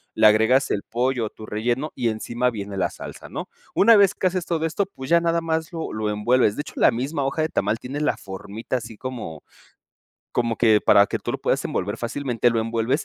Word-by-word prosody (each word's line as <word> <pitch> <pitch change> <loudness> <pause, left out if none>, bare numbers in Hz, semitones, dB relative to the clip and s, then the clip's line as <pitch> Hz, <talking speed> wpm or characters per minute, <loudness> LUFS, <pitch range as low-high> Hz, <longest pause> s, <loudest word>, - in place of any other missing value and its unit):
le - - +4
agregas 110 +5 +4
el 100 - 0
pollo 125 0 -1
o - - -4
tu 110 - -11
relleno, 120 +8 -2
y 120 -3 0
encima 120 +3 -1
viene 100 -4 -6
la 90 -3 0
salsa, - - -10
¿no? - - -6 0.3
Una 230 +3 +7
vez 200 -3 +5
que 185 - +1
haces 180 -1 -2
todo 165 -2 -1
esto, 165 +5 0
pues, 135 -9 -10
ya 170 0 +5
nada 170 0 +1
más 160 0 -2
lo 165 -2 -5
lo 110 0 -2
envuelves. 105 +1 +2
De - - -2
hecho, - - -10
la - - +6
misma 135 +5 -2
hoja 135 +4 0
de 155 - 0
tamal, 105 +3 0
tiene 135 +5 -6
la 150 - +1
formita 100 +6 -5
así 115 -2 -8
como 115 - -6 0.9
como 115 -2 0
que, 110 -2 +4
para 100 - +6
que - - -3
tú - - -4
lo - - -3
puedas - - 0
envolver 105 +4 -2
fácilmente. 120 0 0
Lo 115 -1 +1
envuelves, 115 +5 0
120 Hz, 225 wpm, -23 LUFS, 110-150 Hz, 0.9 s, Una